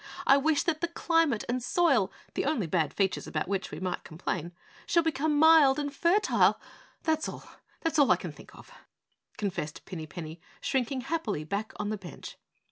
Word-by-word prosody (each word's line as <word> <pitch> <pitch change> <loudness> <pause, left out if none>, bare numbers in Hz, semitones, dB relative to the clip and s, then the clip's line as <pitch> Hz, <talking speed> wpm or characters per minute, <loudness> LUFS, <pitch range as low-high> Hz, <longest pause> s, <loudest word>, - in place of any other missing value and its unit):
I 270 - +7
wish 290 +1 +2
that 315 -2 -1
the 340 - +1
climate 330 -7 +1
and 250 +1 -1
soil, 265 - +2 0.2
the - - -1
only 275 - 0
bad 160 -2 0
features 195 -2 -1
about 155 - -2
which 195 0 -2
we 150 - -7
might 185 0 -3
complain, 170 +1 -4 0.4
shall 340 - +3
become 310 -1 0
mild 310 -3 +7
and 285 -1 -3
fertile! 355 +8 +3 0.4
That's 315 -1 0
all, - - -8 0.4
that's 325 -1 0
all 285 - +5
I - - +7
can - - -6
think - - -15
of!" - - -15 0.7
confessed 175 -7 -4
Pinny 160 -4 -7
Penny, 160 0 -8 0.2
shrinking 265 0 -1
happily 250 - -2
back 200 +7 -3
on 210 0 -3
the 215 - -2
bench. 180 -3 -10
260 Hz, 180 wpm, -29 LUFS, -, 0.7 s, I